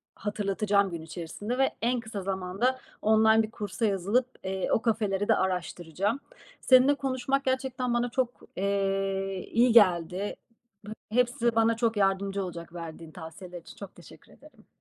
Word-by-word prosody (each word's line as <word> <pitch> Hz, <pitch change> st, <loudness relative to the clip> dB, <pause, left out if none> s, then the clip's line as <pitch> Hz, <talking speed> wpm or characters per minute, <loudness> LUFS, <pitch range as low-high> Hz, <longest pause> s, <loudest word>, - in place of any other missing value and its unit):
hatırlatacağım 200 Hz, -1 st, 0 dB
gün 170 Hz, -1 st, -5 dB
içerisinde 170 Hz, +8 st, -5 dB
ve 270 Hz, 0 st, +2 dB
en 245 Hz, +2 st, +1 dB
kısa 220 Hz, -3 st, -6 dB
zamanda 195 Hz, +7 st, -1 dB, 0.2 s
online 220 Hz, +1 st, +5 dB
bir 215 Hz, -, -6 dB
kursa 205 Hz, -1 st, -3 dB
yazılıp, 205 Hz, +5 st, +1 dB, 0.2 s
eee, 190 Hz, 0 st, -2 dB
o -, -, +3 dB
kafeleri 210 Hz, -3 st, 0 dB
de 225 Hz, -, +5 dB
araştıracağım. 185 Hz, -, -2 dB, 0.4 s
Seninle 260 Hz, +2 st, +6 dB
konuşmak 270 Hz, 0 st, -1 dB
gerçekten 260 Hz, -1 st, -1 dB
bana 240 Hz, +1 st, +1 dB
çok, 255 Hz, 0 st, 0 dB, 0.3 s
eee, 195 Hz, -1 st, -1 dB
iyi 240 Hz, +1 st, +4 dB
geldi. 185 Hz, -2 st, +3 dB, 0.5 s
Ba -, -, -7 dB, 0.2 s
hepsi 240 Hz, 0 st, +1 dB
bana 225 Hz, 0 st, +3 dB
çok 230 Hz, -1 st, 0 dB
yardımcı 195 Hz, 0 st, +1 dB
olacak, 170 Hz, -2 st, -7 dB
verdiğin 165 Hz, -1 st, -8 dB
tavsiyeler 175 Hz, +2 st, -9 dB
için -, -, -14 dB
çok 200 Hz, -2 st, -10 dB
teşekkür 175 Hz, -, -16 dB
ederim. -, -, -19 dB
205 Hz, 145 wpm, -28 LUFS, 190-235 Hz, 0.5 s, Seninle